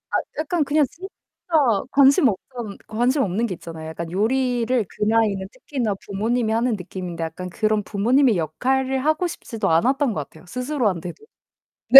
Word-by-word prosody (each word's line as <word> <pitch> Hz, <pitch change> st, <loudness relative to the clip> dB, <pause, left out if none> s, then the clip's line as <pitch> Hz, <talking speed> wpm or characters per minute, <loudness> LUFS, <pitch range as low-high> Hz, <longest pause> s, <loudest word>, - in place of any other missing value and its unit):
아 -, -, -3 dB, 0.2 s
약간 310 Hz, 0 st, 0 dB
그냥 295 Hz, +2 st, +3 dB
진짜 375 Hz, +3 st, -9 dB, 0.8 s
관심 275 Hz, -1 st, +6 dB
없던 215 Hz, +1 st, -5 dB
관심 245 Hz, +6 st, +1 dB
없는 210 Hz, +3 st, 0 dB
게 195 Hz, -, -3 dB
있잖아요. 160 Hz, -2 st, -8 dB
약간 165 Hz, +1 st, -6 dB
요리를 240 Hz, +3 st, +1 dB
그 -, -, -3 dB
나이는 210 Hz, -3 st, +2 dB
특히나 255 Hz, -5 st, -2 dB
부모님이 220 Hz, +3 st, 0 dB
하는 235 Hz, +2 st, +1 dB
느낌인데 180 Hz, -2 st, -5 dB
약간 165 Hz, +3 st, -6 dB
그런 215 Hz, +3 st, +1 dB
부모님의 230 Hz, +4 st, +3 dB
역할을 260 Hz, -, 0 dB
하고 310 Hz, +3 st, +2 dB
싶지도 225 Hz, -, -3 dB
않았던 260 Hz, -, +3 dB
것 150 Hz, -7 st, -4 dB
같아요, 160 Hz, +3 st, -17 dB
스스로한테도. 245 Hz, -, -2 dB, 0.7 s
네. 270 Hz, -, +13 dB
225 Hz, 360 characters per minute, -23 LUFS, 190-265 Hz, 0.8 s, 네